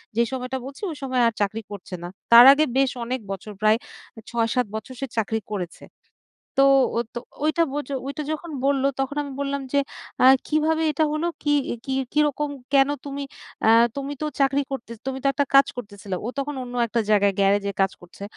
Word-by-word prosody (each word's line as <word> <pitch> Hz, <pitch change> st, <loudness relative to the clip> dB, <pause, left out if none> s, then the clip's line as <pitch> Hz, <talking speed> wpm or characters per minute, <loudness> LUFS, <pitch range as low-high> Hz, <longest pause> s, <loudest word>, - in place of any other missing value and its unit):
যেই 235 Hz, +1 st, +2 dB
সময়টা 260 Hz, 0 st, -3 dB
বলছি 275 Hz, +6 st, -10 dB
ওই 310 Hz, -, -6 dB
সময় 255 Hz, -2 st, 0 dB
আর 230 Hz, -, 0 dB
চাকরি 215 Hz, +2 st, -1 dB
করছে 185 Hz, -2 st, -7 dB
না। 175 Hz, -, -4 dB, 0.2 s
তার 235 Hz, +2 st, +11 dB
আগে 305 Hz, +2 st, +2 dB
বেশ 270 Hz, -1 st, +3 dB
অনেক 255 Hz, +2 st, -2 dB
বছর 195 Hz, +2 st, -6 dB
প্রায় 215 Hz, +1 st, +4 dB, 0.4 s
এ -, -, -12 dB
৬-৭ 235 Hz, +1 st, +1 dB
বছর 235 Hz, +4 st, -6 dB
সে 275 Hz, -, -2 dB
চাকরি 225 Hz, 0 st, 0 dB
করেছে। 180 Hz, -5 st, -5 dB, 0.8 s
তো -, -, +7 dB, 0.3 s
ও -, -, +2 dB, 0.2 s
তো -, -, -2 dB, 0.3 s
ওইটা 310 Hz, +2 st, +2 dB
বচ 290 Hz, -2 st, -3 dB, 0.2 s
ওইটা 290 Hz, +2 st, -4 dB
যখন 330 Hz, +2 st, -6 dB, 0.2 s
বললো 275 Hz, -1 st, +2 dB
তখন 270 Hz, +2 st, -2 dB
আমি 280 Hz, -1 st, -7 dB
বললাম 280 Hz, 0 st, -2 dB
যে, 285 Hz, -, +4 dB, 0.4 s
"আ -, -, +6 dB, 0.2 s
কিভাবে 315 Hz, +1 st, +1 dB
এটা 310 Hz, +2 st, +2 dB
হলো? 310 Hz, +2 st, -1 dB, 0.2 s
কি 295 Hz, -, +1 dB, 0.3 s
কি 265 Hz, -2 st, -2 dB, 0.2 s
কিরকম 295 Hz, -1 st, +1 dB, 0.2 s
কেন? 270 Hz, 0 st, +6 dB, 0.2 s
তুমি 280 Hz, 0 st, -5 dB, 0.4 s
অ্যা 220 Hz, -, +5 dB, 0.3 s
তুমি 280 Hz, +1 st, -4 dB
তো -, -, 0 dB
চাকরি 275 Hz, +1 st, +3 dB
করতে 265 Hz, -4 st, -6 dB, 0.2 s
তুমি 265 Hz, 0 st, -2 dB
তো -, -, +3 dB
একটা 285 Hz, +2 st, +1 dB
কাজ 275 Hz, 0 st, +8 dB
করতেছিলা।" 200 Hz, -5 st, -6 dB
ও -, -, -2 dB
তখন 285 Hz, +1 st, -2 dB
অন্য 245 Hz, 0 st, -8 dB
একটা 230 Hz, +1 st, 0 dB
জায়গায় 200 Hz, -1 st, +4 dB
গ্যারেজে 200 Hz, 0 st, +2 dB
কাজ 195 Hz, 0 st, +3 dB
করছে। 175 Hz, +3 st, -14 dB
265 Hz, 195 wpm, -24 LUFS, 220-280 Hz, 0.8 s, তার